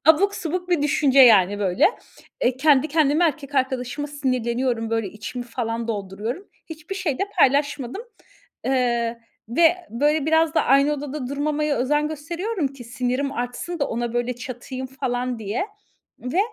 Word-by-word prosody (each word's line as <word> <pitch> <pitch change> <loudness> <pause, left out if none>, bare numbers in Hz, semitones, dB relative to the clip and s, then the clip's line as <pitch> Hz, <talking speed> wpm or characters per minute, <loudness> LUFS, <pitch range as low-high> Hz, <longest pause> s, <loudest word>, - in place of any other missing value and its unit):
Abuk 395 +6 +5
subuk 355 +2 -3
bir 325 -5 +2
düşünce 280 -2 +4
yani 205 -5 +7
böyle. 190 -3 +3 0.6
Eee, 250 +1 +2
kendi 295 +1 +4
kendime 310 +2 +3
erkek 290 -3 -2
arkadaşıma 260 +2 -1
sinirleniyorum, 250 -4 -1
böyle, 225 -3 0
içimi 240 +5 -6
falan 230 -1 -3
dolduruyorum. 215 - -4 0.2
Hiçbir 320 +3 -7
şey 345 -9 -2
de - - 0 0.2
paylaşmadım. 280 - +2 0.6
Eee, 235 -3 0 0.3
ve 330 +7 +4
böyle 295 +5 +1
biraz 320 0 +3
da - - +3
aynı 275 +3 +4
odada 285 -2 -4
durmamaya 295 +1 0
özen 295 +4 +1
gösteriyorum 335 +3 -3
ki 265 -3 -12
sinirim 255 +3 -2
artsın 245 +7 -4
da 280 - 0
ona 235 0 -2
böyle 240 0 -1
çatayım 255 +1 -6
falan 250 -2 -3
diye 220 - -2 0.5
ve 255 +9 -3
265 Hz, 145 wpm, -23 LUFS, 240-300 Hz, 0.6 s, yani